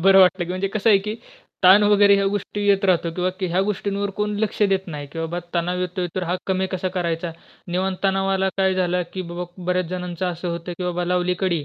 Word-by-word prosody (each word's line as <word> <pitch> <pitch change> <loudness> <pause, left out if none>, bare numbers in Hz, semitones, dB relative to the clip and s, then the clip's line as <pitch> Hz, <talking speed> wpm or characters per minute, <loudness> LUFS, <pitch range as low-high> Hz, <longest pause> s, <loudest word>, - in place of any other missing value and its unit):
बरं 195 +2 +6
वाटलं 185 -1 +4
की - - -11
म्हणजे 185 +1 -1
कसं 215 +2 +1
आहे 200 - +6
की 210 +2 -4 0.5
ताण 190 +3 +8
वगैरे, 205 -1 +6
ह्या 200 - +2
गोष्टी 205 +1 -3
येत 195 0 +3
राहतात 175 -3 +2
किंवा 185 0 +1
ह्या 185 0 +1
गोष्टींवर 200 0 -2
कोण 210 0 -1
लक्ष 215 0 -1
देत 195 -2 +2
नाही, 150 -3 -6
की 165 - -7
"बाबा 165 +2 -3 0.2
तणाव 175 +1 0
येतोय, 180 0 -2
तर 185 - -2
हा 175 +1 -1
कमी 190 0 0
कसा 185 0 -1
करायचा? 170 -1 -1 0.4
निव्वळ 185 +2 0
तणावाला 195 0 +2
काय 190 -1 +3
झालं." 180 -1 +1
की 185 - -4
बाबा 175 +1 -4 0.2
बऱ्याच 180 -1 +1
जणांचं 180 0 -3
असं 175 0 -3
होतं, 170 +1 -4
की 180 - -3
बाबा 180 0 -1
लावली 180 0 +1
कडी 175 -6 0
185 Hz, 220 wpm, -22 LUFS, 175-195 Hz, 0.5 s, ताण